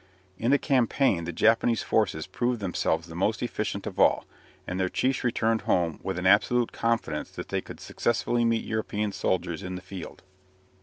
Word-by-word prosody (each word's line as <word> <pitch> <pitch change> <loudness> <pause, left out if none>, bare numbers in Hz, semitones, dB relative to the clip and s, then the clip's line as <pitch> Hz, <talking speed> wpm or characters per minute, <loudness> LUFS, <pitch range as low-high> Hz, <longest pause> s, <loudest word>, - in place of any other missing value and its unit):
In 115 - 0
the 140 - +6
campaign 125 - +2
the 85 - -3
Japanese 115 +5 +3
forces 95 -8 +1
proved 120 +5 -1
themselves 85 -4 -1
the 85 - -11
most 95 +4 0
efficient - - -3
of - - -6
all, - - +4 0.4
and 90 +1 -4
their 95 -1 +1
chiefs 130 +5 0
returned 115 -2 +1
home 85 -3 0
with 95 - -3
an 90 - -3
absolute 115 +5 +4
confidence 115 -10 -1
that - - -8
they - - -1
could - - -11
successfully 120 0 0
meet 115 -1 +1
European 105 -1 -2
soldiers 90 -2 -1
in 95 -1 -5
the - - -5
field. 95 -3 -9
105 Hz, 175 wpm, -27 LUFS, 90-115 Hz, 0.4 s, the